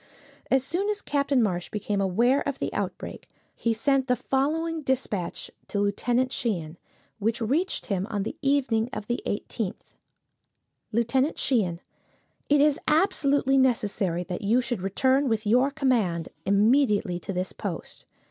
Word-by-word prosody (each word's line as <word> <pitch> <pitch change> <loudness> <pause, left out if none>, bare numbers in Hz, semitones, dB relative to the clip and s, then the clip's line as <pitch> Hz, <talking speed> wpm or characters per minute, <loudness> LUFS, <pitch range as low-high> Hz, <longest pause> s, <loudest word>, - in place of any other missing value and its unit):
As 265 -1 +3
soon 355 +9 -1
as 420 -1 -1
Captain 280 - +1
Marsh 180 -4 -1
became 205 -1 -2
aware 235 +8 +3
of 280 - -4
the - - -3
outbreak, - - -5 0.3
he 230 - 0
sent 265 +4 +1
the 250 - +3
following 310 +6 -1
dispatch 250 - -2 0.2
to 200 - -2
Lieutenant 240 +5 +1
Sheehan, 175 - -2 0.4
which 220 +2 0
reached 280 - 0
him 195 -2 -1
on 205 -3 -1
the - - -5
evening 265 -5 +1
of 205 - -4
the 240 +2 -2
18th: 205 0 -3 1.1
"Lieutenant 245 +6 +1
Sheehan: 185 -10 +1 0.7
"It 290 -1 +5
is 295 -1 +3
absolutely 285 -5 +3
necessary 205 -8 +1
that 180 +2 -5
you 220 +4 +3
should 240 -5 -2
return 260 +8 +2
with 220 -1 0
your 250 +6 +4
command 235 - 0 0.2
immediately 210 -2 +3
to 195 - -6
this 185 0 -3
post. - - -6
240 Hz, 145 wpm, -26 LUFS, 200-275 Hz, 1.1 s, It